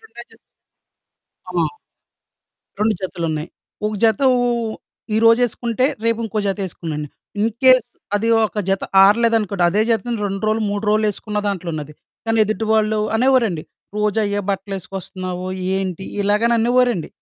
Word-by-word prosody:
2 445 - -10
జత - - -19 1.1
ఆ! - - -7 1.3
2 215 +1 +2
జతలున్నాయి. 165 -4 -3 0.4
ఒక 215 - -2
జత 220 -3 +3
ఓ-ఓ 245 -1 +2 0.2
ఓ - - -7 0.4
ఈ - - +2
రోజేసుకుంటే 235 +1 +3 0.2
రేపు 230 0 +2
ఇంకో 215 -1 -3
జత 195 +1 -1
ఏసుకునేన్ని. 155 -4 -5 0.3
ఇన్ 220 +2 +2
కేస్ 255 -2 +6 0.3
అది 215 +3 +1 0.2
ఒక 215 0 -2
జత 195 0 +1 0.2
ఆరలేదనుకోండి 210 -3 +3
అదే 205 +4 +1
జతను 230 +1 0
2 195 0 -3
రోలు, 220 +1 +1
3 205 +1 -3
రోలు 215 +1 +2
ఎసుకున్న 210 +1 -5
దాంట్లో 185 -3 -3
ఉన్నది. 150 -1 -6 0.3
కానీ 225 0 +1
ఎదుటివాళ్ళు 215 0 +1 0.2
అనేవోరండి 230 -8 +2 0.3
"రోజు 210 0 +1
అయే 205 0 -1
బట్టలేసుకొస్తున్నావు 190 -2 -5 0.3
ఏంటి?" 190 -1 -3 0.2
ఇలాగననేవారండి. 235 0 +2
210 Hz, 130 wpm, -20 LUFS, 190-230 Hz, 1.3 s, కేస్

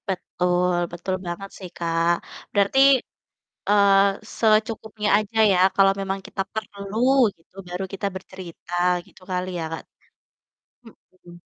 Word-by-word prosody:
Betul, 180 -1 0 0.2
betul 175 +2 -3
banget 185 +3 -5
sih 185 -2 -9
Kak, 165 0 +1 0.4
berarti, 200 +5 +2 0.9
eee, 200 -1 +5 0.4
secukupnya 215 -1 +1
aja 215 +1 -4 0.2
ya, - - +2 0.2
kalau 195 0 +5
memang 195 0 -2
kita - - -3
perlu 205 -1 -6 0.4
gitu, 165 +3 -33
baru 180 +2 -4
kita 195 +1 -2
bercerita 185 -2 -10 0.3
gitu - - -20
kali 180 0 -1
ya - - -3
Kak? 160 - -6 1.0
Mhm. 185 -5 -18
195 Hz, 120 wpm, -23 LUFS, 180-205 Hz, 1.0 s, eee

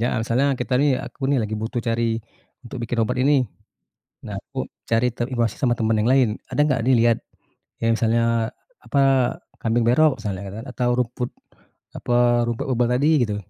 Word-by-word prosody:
alasannya 115 +4 +1 0.2
kita 125 - -2
nih 145 -1 +4
aku 135 - -6
nih 140 +1 +2
lagi 110 0 -3
butuh 110 +2 -3
cari, 115 -1 -1 0.4
untuk 125 +1 -9
bikin 115 0 -1
obat 125 +3 -1
ini, 135 +2 +4 0.8
nah - - -7
aku - - -6 0.2
cari 115 +2 +2
te 120 - -1
informasi 120 -3 -1
sama 125 -4 +1
teman 110 -2 +1
yang 110 +2 +1
lain 130 -3 +4 0.2
ada - - 0
enggak 135 -6 +2
dilihat, 120 -2 +4 0.6
yang 115 0 +2
misalnya, 115 0 +1 0.3
apa, 140 - +1 0.6
kambing 115 +1 +1
berok 135 0 +3
misalnya 100 -3 -4 0.2
kan - - -9
atau 125 -1 -1
rumput, 125 0 -3 0.7
apa 120 0 +2
rumput 120 -1 -3
obat 120 -1 +2
tadi 140 +4 +2 0.2
gitu. 105 -2 -3
120 Hz, 170 wpm, -22 LUFS, 115-125 Hz, 0.8 s, nih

